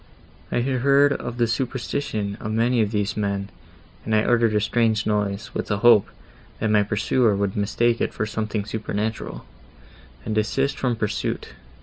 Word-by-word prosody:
I - - +1
had 130 +1 0
heard 140 +1 +5
of 120 -3 -5
the 120 - +3
superstition 115 -3 -2
of 110 - -4
many 115 +2 +2
of 105 - +1
these 105 -1 -1
men, 100 -1 -2 0.5
and 110 - 0
I 110 - +3
uttered 115 -2 +2
a - - +4
strange 110 0 +1
noise, 105 -1 -1
with - - -3
a 105 - +1
hope, 110 -2 +5 0.5
that 110 - 0
my 105 -1 +5
pursuer 110 +2 +1
would 100 -1 -1
mistake 115 +3 +1
it - - 0
for 105 - -2
something 110 -1 -3
supernatural, 110 0 -4 0.8
and 110 - -2
desist 135 +6 0
from 125 -2 0
pursuit. 105 -2 -2
110 Hz, 165 wpm, -23 LUFS, 105-120 Hz, 0.8 s, heard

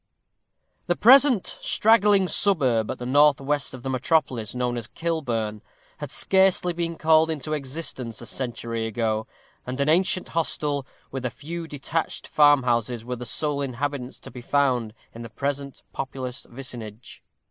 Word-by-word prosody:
_ - - -44
The 175 - +2
present 255 -1 +6 0.2
straggling 210 -3 +4
suburb 130 - +2
at - - -3
the 125 - -7
north 145 +2 +4
west 140 0 -1
of 125 - -12
the 135 - -3
metropolis, 130 -4 0
known 125 -1 -1
as 115 -2 -5
Kilburn, 120 -11 -3 0.4
had - - -6
scarcely 190 -2 +2
been 170 0 -3
called 160 0 +4
into 155 -1 -3
existence 135 -5 -3
a - - -7
century 115 -2 -3
ago, 110 0 -1 0.4
and 130 +2 -6
an 140 +1 +1
ancient 180 +2 +2
hostel, 150 -4 -1 0.2
with 135 -1 -5
a 125 - 0
few 165 +6 -7
detached 155 +2 -3
farmhouses, 125 -6 +3
were 125 0 -3
the 120 0 -7
sole 145 0 -1
habitations 135 0 -4
to - - -10
be 125 +1 -9
found 125 -5 0 0.2
in 115 - -9
the 115 - -8
present 140 +4 -4
populous 130 -1 -5
vicinage. 120 -3 -8
135 Hz, 155 wpm, -24 LUFS, 120-160 Hz, 0.4 s, present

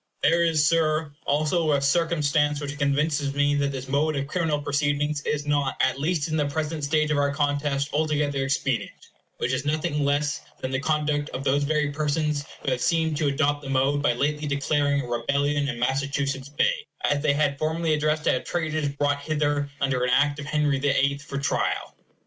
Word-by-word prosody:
There 165 +3 +4
is, 155 -3 +3
Sir, 155 -2 +1 0.2
also 155 +2 +2
a 140 - +3
circumstance 150 -1 +1
which 145 0 -6
convinces 140 0 0
me 145 0 +2
that 140 -1 0
this 135 -1 -6
mode 145 +3 +1
of 140 0 -1
criminal 155 -1 -1
proceeding 145 +1 0
is 145 -1 -1
not, 145 -2 0
at 130 0 +1
least 160 +1 0
in 155 - -2
the 145 -2 +1
present 155 +1 -3
stage 155 +1 +1
of 145 - +2
our 140 0 +2
contest, 145 -1 0
altogether 145 -2 0
expedient; 135 -2 -1 0.4
which 125 - -1
is 130 +1 -1
nothing 150 0 -1
less 145 +1 0 0.2
than 130 - -4
the 135 - 0
conduct 150 0 0
of 130 - -4
those 140 +1 +2
very 150 -1 +1
persons 150 0 -1 0.2
who 135 - 0
have 125 -1 -1
seemed 160 0 +1
to 155 -1 +1
adopt 145 +1 +1
that 135 - -8
mode 135 +2 +2
by 140 -4 +2
lately 150 +4 -1
declaring 145 0 +1
a 125 - -7
rebellion 140 +4 0
in 125 - -4
Massachusetts 135 +2 -1
Bay, 145 - 0 0.2
as 145 0 +1
they 145 -1 +2
had 145 -1 0
formerly 160 +1 0
addressed 150 0 0
to - - +3
have 130 - -1
traitors 155 -3 -1
brought 145 0 0
hither, 145 -1 0
under 135 -3 0
an 125 - +1
Act 145 +3 +2
of 145 - -6
Henry 150 -2 +1
the 145 +1 +1
Eighth, 140 +1 +1
for 140 -1 -6
trial. 140 - -1
145 Hz, 195 wpm, -25 LUFS, 140-150 Hz, 0.4 s, There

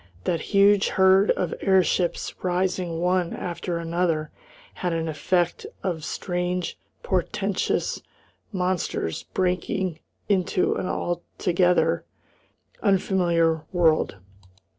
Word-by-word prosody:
That 170 -2 0
huge 200 0 +4
herd 190 +1 +4
of - - +1
airships 185 -2 +2
rising 180 -2 -1
one 180 -1 +1
after 175 0 -3
another 165 -2 -1 0.4
had 180 -2 -2
an 165 0 -1
effect 175 +3 0 0.2
of 170 -4 -2
strange, 180 +2 -2 0.3
portentous 485 - -1 0.5
monsters 180 - -2
breaking 185 -1 0 0.3
into 185 -2 +2
an 185 - -3
altogether 175 +1 +1 0.8
unfamiliar 175 -5 +2
world. 165 - +2
180 Hz, 90 wpm, -25 LUFS, 170-185 Hz, 0.8 s, huge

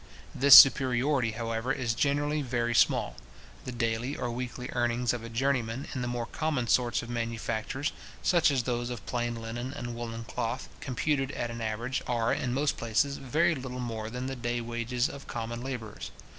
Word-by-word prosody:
This 140 +1 +8
superiority, 130 -2 +6
however, 115 +2 -2
is 125 -4 0
generally 145 +4 +1
very 120 -3 -1
small: - - +2 0.5
the 130 - -4
daily 120 +3 -1
or 120 - -3
weekly 125 +1 -5
earnings 120 0 +1
of 115 -1 -6
journeymen 125 0 -1
in 130 - -3
the 120 - -2
more 120 -1 -2
common 150 -2 -2
sorts 120 +3 +2
of 120 - -9
manufactures, 115 +3 -2 0.3
such 170 -4 +4
as 135 -4 +1
those 120 -1 -2
of 120 -2 -6
plain 120 -1 -2
linen 115 +3 -5
and 120 -4 -5
woollen 115 -1 -5
cloth, 115 +2 -4
computed 135 +1 -1
at 120 -1 -3
an 115 0 -6
average, 115 +4 -2
are, 115 -2 +1
in 125 - -1
most 140 +3 0
places, 115 +5 0
very 155 +6 +2
little 130 -3 -6
more 110 -3 -4
than 125 +2 -5
the 135 0 -3
day 120 -1 -2
wages 120 +2 -1
of 140 -1 -10
common 115 0 -4
labourers. 120 -5 -6
120 Hz, 175 wpm, -29 LUFS, 115-130 Hz, 0.5 s, This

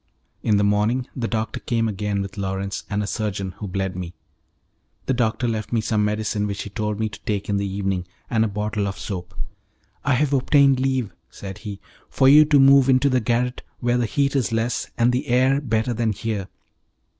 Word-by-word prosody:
In 105 -2 +2
he 100 - +2
morning 105 +5 +1
the 120 -3 -2
doctor 110 -1 -2
came 115 -2 0
again 105 -1 -2
with 100 0 -8
Lawrence 100 0 -3
and 105 0 -1
a - - -2
surgeon, 100 -3 -3
who 105 - -4
bled 95 -1 -2
me. 90 -1 -6 0.9
The 135 - +1
doctor 120 0 0
left 110 -2 -3
me 120 - +2
some 110 -1 0
medicine 105 0 -1
which 100 -1 -4
he 105 - -9
told 105 0 -2
me 110 - +1
to 105 - -10
take 105 -2 -2
in 100 - +1
the 100 0 -1
evening, 95 -2 -2 0.2
and 110 -2 +2
a - - +2
bottle 105 0 -2
of 100 0 -4
soap. 95 -2 -6 0.7
"I 140 -2 +2
have 145 +2 +1
obtained 135 0 +4
leave," 130 -4 0 0.2
said 95 -2 -8
he, 100 -2 -7 0.3
"for 130 - +3
you 150 +3 +8
to 145 -1 +4
move 135 0 +6
into 130 +2 +4
the 130 -1 +2
garret 120 +2 -1 0.2
where 120 0 +1
the 120 - +1
heat 140 +5 0
is 130 -4 +1
less, 115 +1 -1
and 120 +1 +3
the 125 +1 -1
air 130 +3 +3
better 115 -2 0
than 115 -1 0
here." 105 -2 -3
110 Hz, 205 wpm, -23 LUFS, 100-125 Hz, 0.9 s, you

